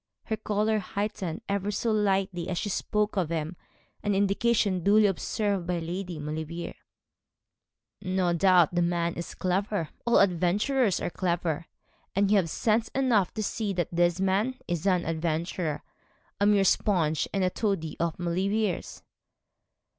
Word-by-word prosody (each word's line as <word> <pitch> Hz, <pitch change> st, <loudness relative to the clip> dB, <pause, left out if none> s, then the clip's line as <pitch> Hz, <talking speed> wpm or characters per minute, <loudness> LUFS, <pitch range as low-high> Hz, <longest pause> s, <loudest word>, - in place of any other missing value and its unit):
Her 220 Hz, -, -2 dB
colour 215 Hz, +1 st, 0 dB
heightened 200 Hz, -1 st, -4 dB
ever 200 Hz, 0 st, -1 dB
so 215 Hz, +3 st, 0 dB
little 195 Hz, -4 st, 0 dB
as 180 Hz, -, -2 dB
she 205 Hz, -, -2 dB
spoke 210 Hz, +1 st, -1 dB
of 175 Hz, -5 st, +1 dB
him, 165 Hz, +1 st, -3 dB, 0.5 s
an 205 Hz, -1 st, 0 dB
indication 200 Hz, -1 st, +2 dB
duly 210 Hz, +3 st, +5 dB
observed 200 Hz, -1 st, -1 dB
by 180 Hz, -1 st, 0 dB
Lady 175 Hz, +1 st, -4 dB
Maulevrier. 155 Hz, +3 st, -5 dB, 1.3 s
'No 185 Hz, -1 st, 0 dB
doubt 175 Hz, -1 st, +4 dB
the 175 Hz, -, +2 dB
man 170 Hz, -1 st, 0 dB
is 170 Hz, -, -6 dB
clever; 185 Hz, -2 st, -1 dB, 0.2 s
all 235 Hz, -, +5 dB
adventurers 200 Hz, +5 st, +2 dB
are -, -, -3 dB
clever; 170 Hz, -3 st, -1 dB, 0.5 s
and 200 Hz, +1 st, +2 dB
you 210 Hz, -, +6 dB
have 175 Hz, -4 st, +1 dB
sense 220 Hz, +5 st, +1 dB
enough 240 Hz, -9 st, +2 dB
to 215 Hz, -, -2 dB
see 210 Hz, -1 st, -2 dB
that 175 Hz, -3 st, -1 dB
this 175 Hz, +1 st, +2 dB
man 195 Hz, +7 st, +1 dB
is 175 Hz, +1 st, -2 dB
an 180 Hz, -2 st, +2 dB
adventurer 165 Hz, 0 st, -2 dB, 0.6 s
a 200 Hz, -, +3 dB
mere 205 Hz, -1 st, +4 dB
sponge 170 Hz, -5 st, +2 dB
and 195 Hz, -2 st, 0 dB
toady 195 Hz, -8 st, -1 dB
of 170 Hz, -2 st, -1 dB
Maulevrier's.' 190 Hz, +3 st, -1 dB
190 Hz, 145 wpm, -27 LUFS, 170-205 Hz, 1.3 s, you